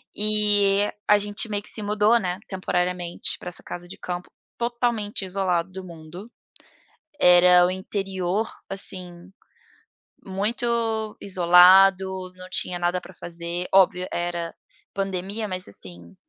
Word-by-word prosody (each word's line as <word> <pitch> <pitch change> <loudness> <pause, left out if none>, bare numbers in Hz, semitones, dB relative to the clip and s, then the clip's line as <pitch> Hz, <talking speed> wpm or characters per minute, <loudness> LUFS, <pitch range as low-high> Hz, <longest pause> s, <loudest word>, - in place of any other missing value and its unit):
e 205 -1 +4 0.3
a 210 - +6
gente 205 +2 -3
meio 205 -1 -2
que - - -7
se 215 - -3
mudou, 210 +3 +3
né, 180 -1 -3
temporariamente 180 -2 -2
para 180 - -6
essa 175 - -9
casa 175 0 -8
de - - -11
campo 180 0 -6 0.3
totalmente 235 -4 -1
isolado 185 -2 -1
do 190 0 -8
mundo. 175 +6 -11 0.9
Era 180 -1 +7
o 180 - 0
interior 190 +1 -3 0.2
assim, 185 -2 -4 0.9
muito 220 +2 -1
isolado, 185 +1 +5
não 185 0 -11
tinha 180 - 0
nada 175 +1 0
para 185 - -13
fazer, 170 +1 -5
óbvio 185 -1 +4
era 175 -1 -3 0.4
pandemia 195 +2 -3
mas 185 -1 -5
assim, 85 -2 -9
185 Hz, 125 wpm, -24 LUFS, 180-205 Hz, 0.9 s, Era